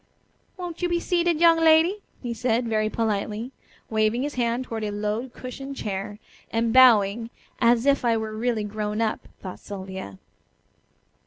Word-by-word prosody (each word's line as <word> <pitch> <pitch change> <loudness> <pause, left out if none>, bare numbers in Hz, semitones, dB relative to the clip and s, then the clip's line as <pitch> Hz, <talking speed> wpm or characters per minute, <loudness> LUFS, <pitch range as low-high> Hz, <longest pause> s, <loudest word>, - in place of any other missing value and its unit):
"Won't 355 -2 -6
you 355 - +1
be 345 0 +1
seated, 345 -2 +1
young 335 -1 +6
lady?" 325 +5 +4 0.2
he 240 -1 -2
said, 235 +1 0
very 215 -1 +1
politely, 220 +2 -2 0.4
waving 220 +3 +1
his 290 +1 -3
hand 240 0 0
toward 225 -3 -5
a 210 - -1
low 210 +4 -2
cushioned 270 +3 -8
chair, 205 -2 -4 0.3
and 230 0 0
bowing 230 -3 +5 0.3
"as 235 0 +3
if 280 -2 +3
I 230 -2 +3
were 220 -1 -4
really 225 -1 -1
grown 210 0 -3
up," 225 -1 -1 0.2
thought 185 -2 -7
Sylvia. 190 - -7
230 Hz, 155 wpm, -25 LUFS, 215-265 Hz, 0.4 s, young